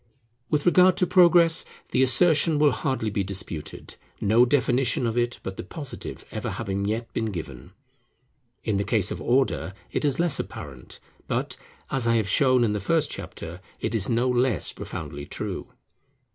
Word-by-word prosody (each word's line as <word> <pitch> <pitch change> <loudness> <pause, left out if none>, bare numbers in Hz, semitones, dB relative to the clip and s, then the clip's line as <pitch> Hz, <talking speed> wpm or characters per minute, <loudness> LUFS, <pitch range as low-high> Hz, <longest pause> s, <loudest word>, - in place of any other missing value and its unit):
With 150 -1 0
regard 180 +1 +5
to 185 - +3
Progress, 175 -2 +5 0.3
the 130 - +2
assertion 155 +4 +4
will 145 -1 +4
hardly 110 -1 -2
be 100 -1 -1
disputed, 95 -5 -5 0.2
no 115 +4 +4
definition 125 -2 +1
of 115 -1 -1
it 120 0 0
but 95 0 -6
the - - -5
Positive 145 -5 -7
ever - - -4
having 100 0 -3
yet 115 +3 -3
been 110 - -1
given. 80 - -7 0.9
In 105 - 0
the 100 - 0
case 105 -3 +1
of - - -5
Order, 125 -6 0 0.2
it - - -1
is 145 -1 +1
less 170 -3 +2
apparent; 65 -3 -8 0.3
but, - - -2 0.4
as 130 -3 0
I 115 - +3
have 110 -3 +1
shown 130 +4 +4
in 110 -3 +1
the 105 - -1
first 150 - +1
chapter, 85 +3 -7 0.2
it 110 - -2
is 105 -3 -1
no 120 +2 +2
less 125 -1 +1
profoundly 75 -2 -7
true. - - -5
120 Hz, 170 wpm, -25 LUFS, 100-145 Hz, 0.9 s, regard